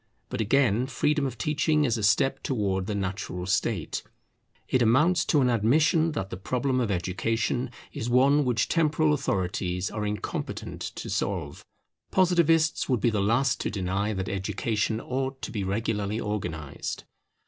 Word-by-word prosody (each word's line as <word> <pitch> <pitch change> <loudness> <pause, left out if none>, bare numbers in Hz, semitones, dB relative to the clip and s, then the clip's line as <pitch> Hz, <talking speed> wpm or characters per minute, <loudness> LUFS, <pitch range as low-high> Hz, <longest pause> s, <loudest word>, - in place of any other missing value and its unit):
But - - -2
again, 120 +1 +2
freedom 145 +2 +1
of 125 -2 -7
teaching 150 +2 +1
is 120 -4 +1
a 110 - -3
step 105 +6 +2
towards 100 -7 -1
the 105 - -2
normal 95 -2 -3
state; 100 -2 -1 0.7
it 130 - +2
amounts 150 +10 +4
to 150 - +3
an 125 - +3
admission 150 +8 +3
that 95 -9 -4
the - - -4
problem 130 +6 -1
of 120 -4 0
education 110 +7 -1 0.2
is 115 - -3
one 135 +4 +4
which 120 -4 +1
temporal 155 -2 +2
authorities 90 -7 -1
are 105 0 -3
incompetent 105 0 -4
to - - -5
solve. - - -3 0.5
Positivists 165 -5 +3
would 125 -3 +2
be 120 - +2
the 105 -2 0
last 120 +6 +2
to - - -1
deny 100 +1 -1
that 95 -2 -3
education 105 +3 -1
ought 130 +2 -3
to - - -4
be 105 -3 -2
regularly 105 +1 -1
organized. 85 -10 -4
115 Hz, 155 wpm, -27 LUFS, 100-140 Hz, 0.7 s, amounts